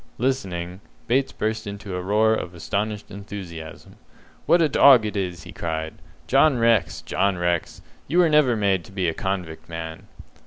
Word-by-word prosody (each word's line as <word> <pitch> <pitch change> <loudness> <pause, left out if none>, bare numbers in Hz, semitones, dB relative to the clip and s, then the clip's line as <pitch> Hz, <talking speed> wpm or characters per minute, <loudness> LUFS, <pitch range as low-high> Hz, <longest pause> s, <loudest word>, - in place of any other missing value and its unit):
Listening, 95 -8 -2 0.2
Bates 135 +3 +1
burst 110 0 -3
into 100 -2 -6
a 90 - -3
roar 105 +4 +3
of 90 -5 -4
astonished 105 +4 -3
enthusiasm. 95 -6 -9 0.5
"What 175 - +5
a 165 - +4
dog 135 -5 +6
it 105 - -4
is!" 90 -4 -3
he - - -10
cried. 80 -1 -4 0.3
"John 135 +1 +4
Rex, 115 -9 +2
John 100 0 0
Rex, 85 -1 -2 0.2
you 165 - -1
were 180 -1 +6
never 150 -6 +4
made 100 -4 +1
to - - -14
be 95 -3 -1
a 80 - 0
convict, 90 -5 -4
man!" 80 -1 -7
100 Hz, 165 wpm, -23 LUFS, 85-115 Hz, 0.5 s, dog